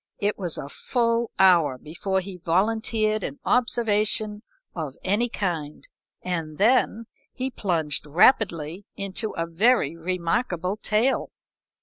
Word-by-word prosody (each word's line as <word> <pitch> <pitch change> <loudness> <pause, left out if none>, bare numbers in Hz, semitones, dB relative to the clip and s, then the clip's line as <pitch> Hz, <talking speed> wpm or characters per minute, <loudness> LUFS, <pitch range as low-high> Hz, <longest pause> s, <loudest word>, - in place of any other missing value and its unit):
It 205 +1 0
was 175 -5 -2
a - - -5
full 230 - 0
hour 170 -8 +5
before 185 +7 -2
he 185 0 -8
volunteered 215 +4 0
an 140 - -4
observation 215 -3 +1 0.3
of 155 -6 -5
any 210 +6 +1
kind, 165 - -4 0.4
and 165 -4 -3
then 230 +1 +3 0.3
he 260 +1 -4
plunged 160 - -2
rapidly 175 - +2
into 200 +2 -2
a 165 - -2
very 170 - +2
remarkable 180 +2 -1
tale. 220 +5 +1
190 Hz, 115 wpm, -25 LUFS, 165-220 Hz, 0.4 s, hour